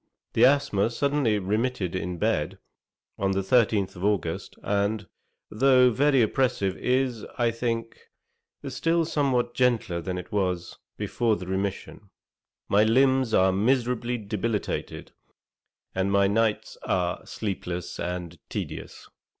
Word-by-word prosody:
The 115 - +6
asthma 125 -7 +3
suddenly 140 -3 +1
remitted 105 -1 -1
in 90 -1 -3
bed, - - 0 0.6
on 95 0 +1
the 95 - 0
13th 100 -3 +2
of 90 - -8
August, 100 -5 -1
and, 100 0 0 0.4
though 125 +2 +5
now - - -2
very 135 0 +4
oppressive, 110 -5 0
is, 125 -3 0
I 120 -2 +2
think, 115 0 -3 0.7
still 165 0 +1
something 135 -6 +1
gentler 120 -9 +1
than 90 +2 -4
it 90 - -8
was 90 -4 -2 0.2
before 115 -3 0
the 90 - -7
remission. 95 +2 -4 0.6
My 105 +1 +4
limbs 130 +1 +3
are 95 0 +4
miserably 120 +3 +1
debilitated, 105 0 -3 0.8
and 95 +1 0
my 100 0 +4
nights 105 +2 0
are 90 -1 -1
sleepless 90 -4 -4
and 90 -2 -4
tedious. - - -6
110 Hz, 125 wpm, -26 LUFS, 95-125 Hz, 0.8 s, The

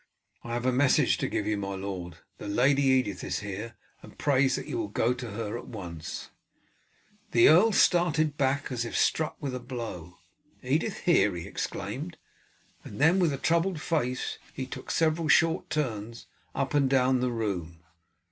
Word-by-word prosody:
"I 120 - -5
have 120 +1 -2
a 130 - +3
message 130 +2 +3
to - - 0
give 105 - -2
you, 105 0 0
my 100 -1 -4
lord. 95 -3 -6 0.2
The - - -7
Lady 135 +7 +3
Edith 130 -8 +2
is - - -2
here, 105 +3 -6 0.3
and - - -14
prays 135 -2 +2
that - - -5
you 355 - -3
will 330 - -2
go 120 - +1
to 125 -1 -7
her 115 +1 -4
at - - -11
once." 85 -7 -7 1.0
The 115 - +7
earl 185 +9 +6
started 165 -6 +3
as 135 -2 0
if 115 - -3
struck 155 -1 +1
with 140 -4 -4
a 125 - -3
blow. 110 -9 -7 0.5
"Edith - - -1
here!" - - +3
he - - -6
exclaimed, - - -5 0.7
and - - -9
then 165 +6 +5
with 170 -4 +3
a 140 - -2
troubled 170 +3 +1
face 135 -6 -2 0.2
he 130 - -3
took 130 - -9
several 160 0 +1
short 165 +2 +3
turns 115 -7 -3 0.3
up 135 0 -1
and 140 -2 +3
down 130 -1 +3
the 125 0 0
room. 90 -8 -4
130 Hz, 175 wpm, -28 LUFS, 110-150 Hz, 1.0 s, The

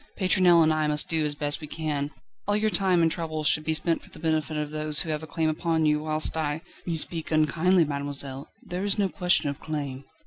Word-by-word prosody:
Pétronelle 185 -3 +4
and 155 0 +3
I 155 -1 0
must 150 0 +1
do 160 -1 +1
as 145 -1 -1
best 145 +2 -1
we 150 - -7
can. 150 -2 -3 0.4
All 205 0 +2
your 215 0 0
time 185 -4 +3
and 165 - +2
trouble 155 -2 -3
should 150 +1 +1
be 160 0 0
spent 165 +1 0
for - - -17
the - - -13
benefit 155 -1 -1
of 150 0 -3
those 155 -1 +3
who 160 - -3
have 150 0 -3
a 160 - -9
claim 160 0 -1
upon 160 0 0
you, 150 0 +2
whilst 155 +1 0
I 155 -1 -2
..." - - -24
"You 165 -2 -1
speak 160 0 +1
unkindly, 160 +3 +3
mademoiselle; 140 -1 -3
there 180 +2 -5
is 200 0 +2
no 200 -2 +1
question 175 -5 +1
of 140 - -10
claim." 140 -4 -5
155 Hz, 240 wpm, -26 LUFS, 150-170 Hz, 0.4 s, Pétronelle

